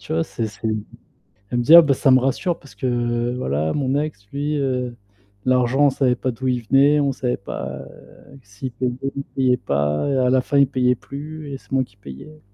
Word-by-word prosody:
Tu -, -, -7 dB
vois, 165 Hz, +1 st, +1 dB
c'est 115 Hz, -7 st, -4 dB
c'est 105 Hz, +2 st, -7 dB
d 110 Hz, -1 st, 0 dB, 0.8 s
elle 120 Hz, -, 0 dB
me -, -, 0 dB
dit: 155 Hz, +7 st, +8 dB
«Ah 170 Hz, -, +12 dB
bah 145 Hz, -4 st, +2 dB
ça 135 Hz, -, +1 dB
me 130 Hz, -, +6 dB
rassure 135 Hz, +7 st, -1 dB
parce 140 Hz, -, -17 dB
que 120 Hz, -1 st, -1 dB
voilà 80 Hz, -, -1 dB
mon 135 Hz, -2 st, 0 dB
ex 145 Hz, -10 st, -5 dB
lui, 145 Hz, +2 st, -1 dB
heu, 125 Hz, -3 st, -2 dB, 0.5 s
l'argent 130 Hz, +2 st, +3 dB
on -, -, +6 dB
savait 130 Hz, -2 st, +1 dB
pas 130 Hz, +1 st, -2 dB
d'où 130 Hz, +2 st, -5 dB
il 125 Hz, -1 st, 0 dB
venait, 140 Hz, +3 st, +5 dB
on 140 Hz, -1 st, +1 dB
savait 125 Hz, -1 st, -2 dB
pas 100 Hz, -, -6 dB, 0.6 s
s'il 105 Hz, +6 st, -7 dB
payait, 120 Hz, +1 st, -2 dB, 0.2 s
s'il 140 Hz, -, -4 dB
payait 130 Hz, -2 st, +2 dB
pas 75 Hz, -, -1 dB
et 135 Hz, -, +1 dB
à 125 Hz, -1 st, +2 dB
la 130 Hz, 0 st, +4 dB
fin 140 Hz, -, -1 dB
il 140 Hz, -1 st, +5 dB
payait 125 Hz, -1 st, +1 dB
plus 145 Hz, +4 st, -8 dB
et 135 Hz, -, -5 dB
c'est -, -, -25 dB
moi 135 Hz, -1 st, +2 dB
qui 100 Hz, -5 st, -17 dB
payais». 100 Hz, -, -11 dB
130 Hz, 225 wpm, -21 LUFS, 120-140 Hz, 0.8 s, Ah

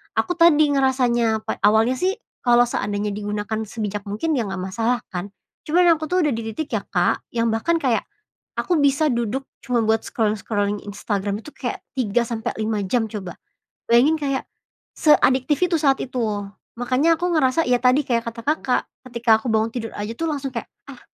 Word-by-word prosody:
aku 355 Hz, -, 0 dB
tadi 310 Hz, -3 st, +5 dB
ngerasanya, 240 Hz, -4 st, +2 dB
pa -, -, -3 dB
awalnya 220 Hz, +4 st, +4 dB
sih 375 Hz, -, 0 dB, 0.3 s
kalau 240 Hz, -1 st, +5 dB
seandainya 205 Hz, -1 st, -2 dB
digunakan 210 Hz, +1 st, -3 dB
sebijak 210 Hz, -2 st, -4 dB
mungkin 295 Hz, +10 st, -1 dB
ya 240 Hz, -, +1 dB
nggak 190 Hz, -1 st, -4 dB
masalah 225 Hz, +6 st, -1 dB
kan. 190 Hz, +2 st, -6 dB, 0.4 s
Cuman 350 Hz, +3 st, +4 dB
aku 310 Hz, 0 st, -5 dB
tuh 365 Hz, -, +3 dB
udah 295 Hz, -, +2 dB
di 225 Hz, -1 st, -4 dB
titik 300 Hz, +7 st, -5 dB
ya, -, -, -2 dB
Kak, -, -, 0 dB
yang 230 Hz, -1 st, 0 dB
bahkan 275 Hz, +10 st, +1 dB
kayak 245 Hz, -7 st, +1 dB, 0.6 s
aku 355 Hz, -, +1 dB
bisa 285 Hz, +2 st, +3 dB
duduk 240 Hz, +1 st, -1 dB, 0.2 s
cuma 245 Hz, -2 st, 0 dB
buat 220 Hz, 0 st, +2 dB
scrolling-scrolling 210 Hz, -3 st, -1 dB
Instagram 205 Hz, 0 st, -3 dB
itu 275 Hz, +4 st, -13 dB
kayak 245 Hz, -, -4 dB, 0.2 s
3 235 Hz, -1 st, +1 dB
sampe 225 Hz, -2 st, -3 dB
5 215 Hz, -2 st, -1 dB
jam 225 Hz, +4 st, 0 dB
coba. 200 Hz, -4 st, -7 dB, 0.5 s
Bayangin 270 Hz, +7 st, +5 dB
kayak 275 Hz, -3 st, -2 dB, 0.5 s
seadiktif 285 Hz, -2 st, +3 dB
itu 360 Hz, -2 st, +2 dB
saat 275 Hz, -2 st, +3 dB
itu. 215 Hz, -6 st, -2 dB, 0.3 s
Makanya 275 Hz, +7 st, +2 dB
aku 355 Hz, -, 0 dB
ngerasa, 305 Hz, +2 st, +2 dB
ya 250 Hz, 0 st, +4 dB
tadi 255 Hz, +4 st, +5 dB
kayak 230 Hz, -2 st, +1 dB
kata 230 Hz, 0 st, -9 dB
Kakak, 285 Hz, -4 st, +1 dB, 0.3 s
ketika 235 Hz, -2 st, +3 dB
aku 240 Hz, -, -1 dB
bangun 220 Hz, +1 st, +2 dB
tidur 225 Hz, -2 st, -4 dB
aja 210 Hz, +2 st, -4 dB
tuh 330 Hz, +2 st, -2 dB
langsung 280 Hz, -2 st, -3 dB
kayak, 230 Hz, -, -4 dB, 0.2 s
"Ah, 265 Hz, -3 st, -11 dB
240 Hz, 180 wpm, -22 LUFS, 215-275 Hz, 0.6 s, tadi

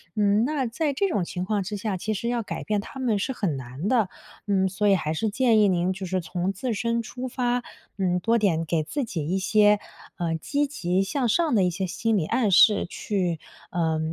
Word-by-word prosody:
嗯， 210 Hz, +1 st, +3 dB
那 285 Hz, -1 st, -1 dB
在 280 Hz, +5 st, -1 dB
这 395 Hz, +9 st, +1 dB
种 205 Hz, -, 0 dB
情 180 Hz, +1 st, -4 dB
况 205 Hz, 0 st, 0 dB
之 205 Hz, +3 st, -4 dB
下， 205 Hz, -1 st, -2 dB
其 215 Hz, +4 st, -2 dB
实 235 Hz, -, -3 dB
要 240 Hz, 0 st, 0 dB
改 215 Hz, -, -5 dB
变 210 Hz, -1 st, 0 dB
他 265 Hz, -, -10 dB
们 230 Hz, -5 st, +1 dB
是 265 Hz, +7 st, -2 dB
很 190 Hz, -, -1 dB
难 130 Hz, +7 st, -5 dB
的。 225 Hz, -6 st, +2 dB, 0.4 s
嗯， 190 Hz, -2 st, +2 dB
所 205 Hz, +3 st, 0 dB
以 195 Hz, -, +6 dB
还 155 Hz, -4 st, -1 dB
是 220 Hz, +7 st, -1 dB
建 230 Hz, 0 st, +3 dB
议 210 Hz, -, +5 dB
您 180 Hz, 0 st, +1 dB
就 190 Hz, 0 st, -6 dB
是 185 Hz, +1 st, 0 dB
从 180 Hz, +3 st, -2 dB
自 235 Hz, +5 st, -2 dB
身 230 Hz, +2 st, 0 dB
出 250 Hz, +3 st, -6 dB
发， 245 Hz, 0 st, -1 dB, 0.3 s
嗯， 180 Hz, -2 st, +1 dB
多 230 Hz, +5 st, +2 dB
点 180 Hz, -7 st, +1 dB
给 160 Hz, -1 st, 0 dB
自 280 Hz, -, -3 dB
己 165 Hz, -10 st, -4 dB
一 185 Hz, +4 st, 0 dB
些， 210 Hz, +1 st, +4 dB, 0.4 s
呃， 170 Hz, -2 st, -1 dB
积 285 Hz, -, -1 dB
极 185 Hz, -9 st, 0 dB
向 245 Hz, +6 st, -1 dB
上 320 Hz, +6 st, +2 dB
的 195 Hz, -, +4 dB
一 180 Hz, -, +3 dB
些 190 Hz, +2 st, -2 dB
心 225 Hz, +5 st, 0 dB
理 160 Hz, -, 0 dB
暗 230 Hz, -3 st, +1 dB
示 205 Hz, +3 st, +6 dB
去 180 Hz, -6 st, -2 dB, 0.3 s
呃， 160 Hz, -2 st, 0 dB
205 Hz, 240 characters per minute, -25 LUFS, 180-235 Hz, 0.4 s, 以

